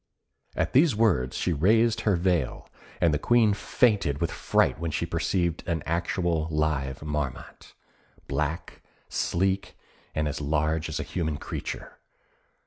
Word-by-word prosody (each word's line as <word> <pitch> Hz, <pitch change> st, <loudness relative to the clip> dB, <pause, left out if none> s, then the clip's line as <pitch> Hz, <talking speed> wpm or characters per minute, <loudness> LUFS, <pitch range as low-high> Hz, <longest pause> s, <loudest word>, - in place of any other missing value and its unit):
At -, -, -1 dB
these 140 Hz, -1 st, +5 dB
words 90 Hz, -, +2 dB
she 90 Hz, -, 0 dB
raised 110 Hz, +8 st, +3 dB
her 105 Hz, -3 st, +2 dB
veil, 85 Hz, -6 st, 0 dB, 0.3 s
and 85 Hz, -3 st, +3 dB
the 75 Hz, -, +1 dB
Queen 115 Hz, +2 st, +4 dB
fainted 100 Hz, -, +1 dB
with -, -, -1 dB
fright -, -, +1 dB
when 85 Hz, 0 st, -2 dB
she 80 Hz, +2 st, -1 dB
perceived 85 Hz, 0 st, -1 dB
an 85 Hz, -4 st, -1 dB
actual 85 Hz, -1 st, 0 dB
live 75 Hz, -3 st, -1 dB
Marmot 75 Hz, -4 st, -5 dB, 0.5 s
black, 75 Hz, +4 st, -3 dB, 0.3 s
sleek, 95 Hz, 0 st, -1 dB, 0.4 s
and 75 Hz, -1 st, 0 dB
as 75 Hz, -, -3 dB
large 75 Hz, +2 st, 0 dB
as 80 Hz, 0 st, -3 dB
a -, -, -2 dB
human 80 Hz, 0 st, -2 dB
creature. -, -, -6 dB
80 Hz, 135 wpm, -27 LUFS, 75-95 Hz, 0.5 s, these